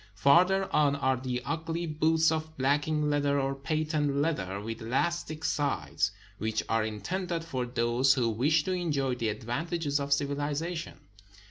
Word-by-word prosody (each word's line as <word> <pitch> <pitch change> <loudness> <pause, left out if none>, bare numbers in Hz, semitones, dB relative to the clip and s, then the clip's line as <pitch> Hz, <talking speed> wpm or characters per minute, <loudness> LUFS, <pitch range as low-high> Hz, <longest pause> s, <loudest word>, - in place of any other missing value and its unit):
Farther 180 - +4
on 145 -2 +4
are 130 -2 +1
the 125 -1 -3
ugly 165 +3 -2
boots 160 +1 +2
of 160 0 -3
blacking 145 +3 +1
leather 145 -1 +2
or 135 0 0
patent 150 +1 -1
leather 120 - -1
with 115 +2 -6
elastic 155 +6 -1
sides, 95 - 0 0.3
which 110 +1 -1
are 115 0 +1
intended 165 - -3
for 130 -6 -3
those 120 +3 +2
who 125 -4 +1
wish 145 +8 +2
to 185 - -2
enjoy 150 -8 0
the 115 -3 -1
advantages 145 - -2
of 140 0 -4
civilization. 145 +4 -1
145 Hz, 145 wpm, -29 LUFS, 125-160 Hz, 0.3 s, Farther